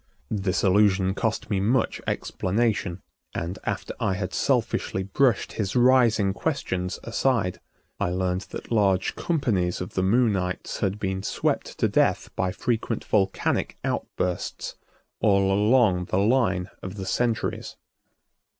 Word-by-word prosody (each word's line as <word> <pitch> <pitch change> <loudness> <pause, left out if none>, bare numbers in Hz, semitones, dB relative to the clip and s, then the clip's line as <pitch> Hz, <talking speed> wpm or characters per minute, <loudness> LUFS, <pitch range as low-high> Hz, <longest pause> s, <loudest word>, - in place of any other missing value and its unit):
This 95 -2 0
allusion 95 -1 +4
cost 110 +1 -2
me 100 - +2
much 115 +4 +1
explanation, 100 -2 -1 0.3
and, 85 +3 -3
after - - -3
I 95 - 0
had 90 -1 -4
selfishly 95 - 0
brushed 115 +5 +1
his 100 -1 -2
rising 120 -5 +4
questions 95 - -2
aside, 115 -5 0 0.4
I - - +1
learned 90 +1 -1
that - - -8
large 100 -4 +2
companies 110 - 0
of 90 - -6
the 95 - 0
Moonites 95 -3 +1
had 100 +1 0
been 95 -2 -2
swept - - -1
into - - +1
death - - +1
by 95 - 0
frequent 115 +2 -2
volcanic 95 -2 0
outbursts 90 -1 -3 0.4
all 100 -1 +3
along 105 -3 +3
the 90 - -1
line 100 -4 +2
of 95 +1 -6
the 95 -2 -5
centuries. 115 +3 -1
100 Hz, 130 wpm, -25 LUFS, 95-115 Hz, 0.4 s, allusion